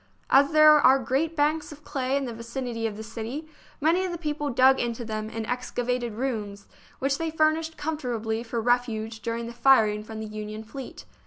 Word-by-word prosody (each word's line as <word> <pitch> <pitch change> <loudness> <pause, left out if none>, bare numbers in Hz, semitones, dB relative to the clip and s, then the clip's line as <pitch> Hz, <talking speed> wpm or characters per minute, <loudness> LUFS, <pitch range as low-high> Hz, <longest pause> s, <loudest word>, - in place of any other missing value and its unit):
As 280 +1 +6
there 305 0 +8
are 270 -3 +6
great 275 +6 -1
banks 305 +1 +1
of 300 0 -12
clay 265 0 -1
in 280 - -2
the 240 - -5
vicinity 230 0 -4
of 210 -2 -6
the 220 - -6
city, 230 +7 -6 0.3
many 330 +5 +2
of 370 - -2
the 345 - -4
people 300 -2 -2
dug 260 +1 +5
into 235 0 -2
them 215 -1 -4
and 225 -1 -4
excavated 245 -1 -2
rooms, 210 -5 -4 0.3
which 275 +1 0
they 325 0 -1
furnished 315 +1 +1
comfortably 240 -8 -2
for 235 0 -3
refuge 225 -2 0
during 230 +1 -3
the 235 - -7
firing 225 -4 +4
from 220 0 -8
the 220 - -4
Union 215 0 -6
fleet. 260 +4 -9
245 Hz, 190 wpm, -26 LUFS, 225-290 Hz, 0.3 s, there